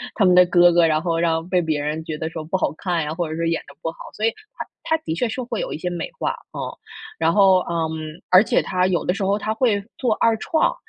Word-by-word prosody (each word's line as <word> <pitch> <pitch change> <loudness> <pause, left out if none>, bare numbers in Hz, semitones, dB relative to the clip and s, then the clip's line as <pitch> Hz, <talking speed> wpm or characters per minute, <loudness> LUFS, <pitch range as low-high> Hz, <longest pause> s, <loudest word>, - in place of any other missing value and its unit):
他 210 - +3
们 180 -1 +5
的 180 0 +8
哥 175 0 +6
哥， 170 -1 +5
然 155 -1 +2
后 165 -1 -1
让 165 0 0
被 180 -1 +2
别 155 -3 -1
人 155 +2 -3
觉 160 -2 -5
得 160 +1 -3
说 160 -1 -6
不 180 +5 -1
好 185 - -1
看 175 -3 -1
呀， 150 +1 -3
或 170 -2 -3
者 160 - -4
说 165 - -1
演 165 0 0
得 140 - -14
不 165 - -2
好， - - -20 0.2
所 215 - -2
以 225 - +5 0.3
它 - - -4 0.2
它 320 - +1
的 160 - -2
确 240 +5 -1
是 255 - -4
会 235 -2 -3
有 - - -4
一 - - -3
些 180 +2 -3
美 175 -1 -4
化， - - 0 0.2
嗯。 - - -6 0.6
然 160 +1 +2
后， 195 -2 +5
嗯， 165 -2 -1 0.4
而 185 +3 +8
且 - - +2
他 185 -1 0
有 180 -2 0
的 180 - +1
时 195 -1 -3
候 200 +2 +1
他 215 +1 -2
会 220 -4 +1 0.2
做 245 -4 +1
二 230 -1 +3
创， 320 - +1
175 Hz, 300 characters per minute, -22 LUFS, 160-200 Hz, 0.6 s, 的